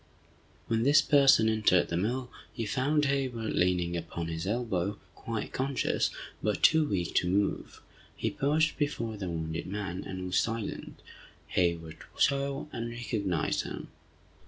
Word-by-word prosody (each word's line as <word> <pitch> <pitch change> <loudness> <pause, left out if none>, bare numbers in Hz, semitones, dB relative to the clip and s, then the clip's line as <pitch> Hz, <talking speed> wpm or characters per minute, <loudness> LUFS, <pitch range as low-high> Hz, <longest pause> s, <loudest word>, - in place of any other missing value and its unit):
When 115 -1 0
this 145 +4 +6
person 140 -6 +5
entered 110 -5 +3
the 85 - -1
mill, 125 +8 -1 0.2
he 115 -3 -4
found 145 +6 +1
Hayward 130 -5 -1
leaning 90 -1 +1
upon 85 0 -4
his 80 +2 -4
elbow, 105 -3 -1 0.2
quite 115 -2 -5
conscious, 135 +1 0 0.3
but 105 -1 -1
too 160 -1 +6
weak 90 -4 -1
to 90 - +2
move. 100 +2 -1 0.3
He - - -1
paused 155 +3 +1
before 115 -7 -1
the 95 -3 -4
wounded 80 0 -3
man, 95 -1 -4
and 95 -1 -5
was 90 0 +2
silent, 115 -2 -4 0.5
Hayward 85 -3 0 0.2
saw, 140 0 +1
and 115 0 -4
recognized 110 -7 -1
him. - - -7
110 Hz, 140 wpm, -30 LUFS, 90-130 Hz, 0.5 s, this